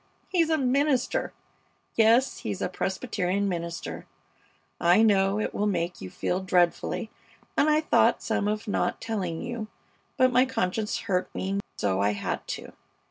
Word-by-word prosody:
he's 335 -4 +2
a 320 - +3
minister! 270 0 +1 0.6
Yes, 230 +4 +4
he's 100 -3 -4
a - - 0
Presbyterian 190 0 -1
minister! 170 -2 -4 0.7
I 175 +6 +5
know 200 -1 +3
it - - -2
will 210 - 0
make 175 -3 -2
you 95 - -6
feel 180 - -2
dreadfully, 185 +4 +1 0.4
and 305 - +3
I 305 0 +4
thought 310 - +3
some 205 - 0
of 215 +2 -2
not 205 - 0
telling 185 -7 -3
you, 240 -3 -4 0.5
but 255 -1 +4
my 250 +1 +6
conscience 210 -3 -1
hurt 180 -2 -1
me 195 +1 -1 0.2
so 95 -1 0
I 100 +1 +2
had 100 - -4
to. - - -6
200 Hz, 150 wpm, -27 LUFS, 180-245 Hz, 0.7 s, my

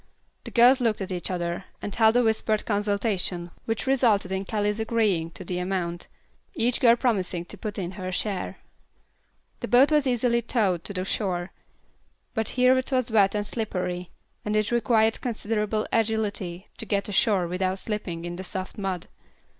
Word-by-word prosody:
The - - -5
girls 250 +2 +6
looked 225 -3 +1
at 190 - -4
each 180 -1 -3
other, 175 0 -3
and 205 - -5
held 220 0 +4
a 245 - +4
whispered 220 -1 +1
consultation 200 -4 0
which 225 +1 -2
resulted 235 -8 +2
in 190 +1 -2
Callie's 210 +1 -1
agreeing 215 -7 +1
to 185 - -8
the 180 0 -2
amount, 180 -2 -2 0.5
each 245 -4 +1
girl 235 -2 +6
promising 190 -8 0
to - - -10
put 215 -3 -5
in 180 -3 -3
her 185 -1 -5
share. 195 +1 -3 1.0
The - - -4
boat 260 +5 +5
was 300 -3 +3
easily 240 -1 +2
towed 200 -8 0
to 200 - -3
the 185 -1 -2
shore; 185 -3 -1 0.8
but 220 -1 0
here 255 +1 +6
it 260 - -5
was 255 -2 +1
wet 205 -2 +4
and 205 0 -1
slippery, 180 -5 -3 0.3
and 210 0 -1
it 215 +1 +1
required 225 -2 +2
considerable 215 -3 -1
agility 210 -5 -1
to 225 - -6
get 200 0 0
ashore 200 -3 +2
without 185 +2 -1
slipping 185 -5 -4
in 175 0 -5
the 190 - -5
soft 190 +2 -5
mud. 185 -3 -2
205 Hz, 170 wpm, -26 LUFS, 185-225 Hz, 1.0 s, girls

